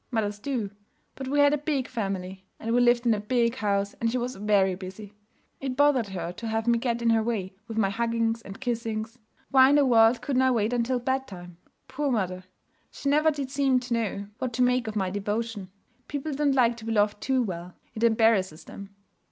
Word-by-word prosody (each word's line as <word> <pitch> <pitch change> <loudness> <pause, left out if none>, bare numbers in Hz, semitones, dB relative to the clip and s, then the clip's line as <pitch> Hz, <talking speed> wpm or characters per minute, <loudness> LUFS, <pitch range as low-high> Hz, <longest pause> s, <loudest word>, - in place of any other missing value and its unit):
Mothers 210 -4 -2
do. 225 -4 -3 0.4
But 265 - -7
we 285 +2 -1
had 285 0 +5
a 295 - 0
big 285 -3 -1
family, 190 -4 -4
and 230 +1 -2
we 245 - +4
lived 240 0 +3
in 235 - +4
a 210 - -1
big 235 +3 0
house, 200 -3 0
and 230 - +2
she 245 - -1
was 250 +1 -3
very 200 -2 +2
busy. 195 +3 -9 0.5
It 265 -2 -3
bothered 285 -6 +3
her 175 -3 -5
to 225 +6 -7
have 220 0 -1
me 235 -1 +3
get 235 -1 -1
in 230 - +4
her 225 -1 +3
way 215 -5 -2
with 225 - -6
my 195 -3 +2
huggings 230 +1 0
and 195 -3 -10
kissings. 230 -2 -3 0.3
Why 265 -1 +7
in 285 - +4
the 290 -1 +5
world 230 -1 +4
couldn't 265 -3 +1
I 260 - +4
wait 230 -2 +1
until 245 +1 +1
bedtime? 235 -9 -4 0.3
Poor 285 +2 -2
mother! 185 -5 -2 0.4
She 280 - -4
never 305 +2 +4
did 280 -3 -4
seem 270 -2 +2
to 250 -1 -4
know 205 -3 -2
what 255 -2 -3
to 250 +2 +2
make 250 -1 +2
of 220 - -4
my 190 -3 -1
devotion. 205 0 -3 0.4
People 290 +1 -4
don't 285 -1 +1
like 240 -3 +3
to 220 - -10
be 225 - -2
loved 205 -1 +1
too 260 -2 +1
well; 180 -3 -6 0.2
it 220 - -7
embarrasses 220 -8 +3
them. 200 0 -11
230 Hz, 215 wpm, -26 LUFS, 205-255 Hz, 0.5 s, Why